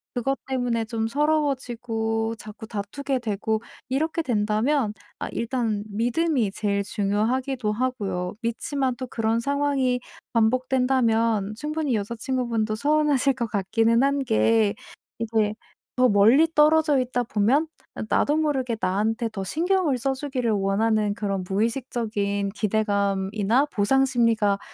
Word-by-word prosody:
그것 270 +3 0
때문에 245 -3 -1
좀 225 0 -2
서러워지고 240 -6 -1
자꾸 220 +1 -10
다투게 235 +7 -3
되고 220 -1 -2 0.3
이렇게 315 +5 0
된다면 220 0 +1 0.2
아 - - -4
일단 230 -3 -1
믿음이 240 +2 0
제일 200 0 -1
중요하기도 215 +5 -1
하고요. 210 -6 -2
믿지만 255 +2 -1
또 255 +1 -6
그런 225 -1 0
상황이 280 -1 0 0.3
반복된다면 230 -3 +1
충분히 300 -2 -1
여자친구분도 230 0 -2
서운하실 285 +1 +2
것 235 -2 -3
같기는 225 +4 +2
한 280 +1 +2
게 225 -3 +2 0.4
이게 220 -2 0 0.4
더 255 0 +4
멀리 225 +10 +5
떨어져 300 -1 +4
있다 245 -1 -1
보면 245 +6 +2 0.3
아 - - -4
나도 295 +1 +2
모르게 270 -6 0
나한테 220 +5 0
더 195 -3 -4
신경을 330 - +1
써 270 +3 0
주기를 260 -4 -2
원하는 210 +1 +1
그런 200 -4 -2
무의식적인 210 -2 -1
기대감이나 205 +2 +1
보상 270 +1 +2
심리가 230 -6 +2
230 Hz, 295 characters per minute, -24 LUFS, 215-265 Hz, 0.4 s, 멀리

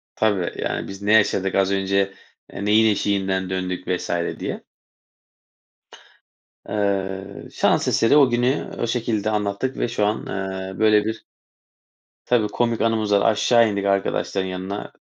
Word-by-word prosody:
Tabii, 100 -5 0
yani, - - -3
biz 95 +1 -9
ne 105 +2 +1
yaşadık 100 -3 +3
az 95 0 +2
önce, 100 0 0 0.4
e, 100 - -6
neyin 110 +1 +4
eşiğinden 95 -2 -1
döndük 90 -1 -3
vs. 90 - -2 0.3
diye. - - -5 2.0
Eee, 95 -2 -3
şans - - +1
eseri 115 +6 +3
o 135 -4 +6
günü 120 +3 0
o - - +1
şekilde 115 -3 -1
anlattık 105 +5 -2
ve - - 0
şu 105 -3 0
an, 105 - -2
eee, 95 0 -5
böyle 105 -1 +4
bir 110 - -4 1.0
Tabii, 115 -4 +2
komik 115 +1 -1
anımız 110 -2 +1
da 100 -1 +4
var, - - +4
aşağı 115 +1 +3
indik 100 0 -2
arkadaşların 100 -1 0
yanına, 95 +2 -5
100 Hz, 145 wpm, -22 LUFS, 95-110 Hz, 2.0 s, o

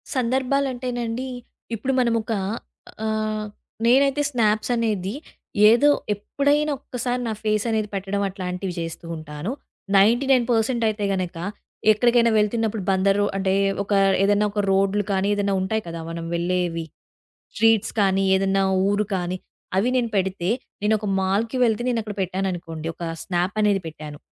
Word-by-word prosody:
సందర్భాలంటేనండి 255 -1 -1 0.5
ఇప్పుడు 265 +5 -2
మనమొక 230 -2 +1 0.7
ఆహ్, 215 0 -1 0.4
నేనైతే 275 +3 +4
స్నాప్స్ 215 -3 +1
అనేది 210 -4 -1 0.6
ఏదో 240 +6 +5 0.2
ఎప్పుడైనా 285 +8 0
ఒక్కసారి 250 0 -3
నా 220 - -1
ఫేస్ 215 0 +1
అనేది 220 -2 0
పెట్టడం 195 +1 -2
అట్లాంటివి 185 -1 -4
జేస్తూ 165 0 -5
ఉంటాను. 155 +5 -5 0.5
99% 240 +1 +3
అయితే 210 -1 -3
గనక 185 -2 -3 0.6
ఎక్కడికైనా 235 +1 +4
వెళ్తున్నప్పుడు 220 0 0
బందరు 195 +2 +2
అంటే 190 0 +1 0.3
ఒక 200 - -2 0.3
ఏదన్నా 205 +1 +3
ఒక 205 0 0
రోడ్లు 195 +1 +2
కానీ 190 0 +1
ఏదన్నా 200 -1 0
ఉంటాయి 220 +3 -1
కదా! 165 0 -5
మనం 165 0 -5
వెళ్ళేవి. 170 -1 -1 0.7
స్ట్రీట్స్ 225 -2 +3
కానీ 195 0 +2
ఏదన్నా 195 0 +2 0.3
ఊరు 205 +1 +1
కానీ 180 0 -2 0.4
అవి 215 +6 +2
నేను 235 -2 0
పెడితే 190 -1 -1 0.3
నేను 210 +1 +2
ఒక 210 - -4
మాల్‍కి 205 +6 0
వెళ్తే 225 0 0
నేను 235 -2 0
అక్కడ 210 -1 -6
పెట్టాననుకోండి. 180 -4 -3
ఒక 170 - -8 0.2
స్నాప్ 180 +2 -1
అనేది 200 -2 +2
పెట్టాను. 150 -2 -8
210 Hz, 130 wpm, -23 LUFS, 190-230 Hz, 0.7 s, ఏదో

